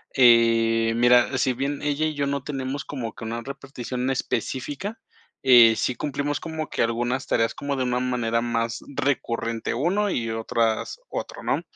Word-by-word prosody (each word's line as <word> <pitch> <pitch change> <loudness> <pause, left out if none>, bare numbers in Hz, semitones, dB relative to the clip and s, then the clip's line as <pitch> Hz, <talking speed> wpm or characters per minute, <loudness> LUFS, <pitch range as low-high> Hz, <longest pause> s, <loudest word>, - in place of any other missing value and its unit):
Eh, 115 -2 +5
mira, 120 +2 +4
sí 130 - +2
bien 140 +3 -3
ella 150 +1 0
y 155 - -1
yo 145 -1 -1
no 140 -1 -2
tenemos 135 0 -4
como 125 -5 -5
que - - -9
una 115 +1 -4
repartición 130 -1 -5
específica, 145 - -3 0.4
eh, 120 -3 +8
sí 125 - -1
cumplimos 145 0 -2
como 160 -1 -5
que - - -2
algunas 120 +3 -1
tareas 115 0 +1
como 140 0 -3
de 130 - -1
una 125 0 0
manera 120 -2 0
más 115 -1 -2
recurrente 115 -4 -1
uno 180 - +1
y 115 -10 -1
otras 115 - -1
otro, - - -6
¿no? - - 0
125 Hz, 165 wpm, -24 LUFS, 115-140 Hz, 0.4 s, eh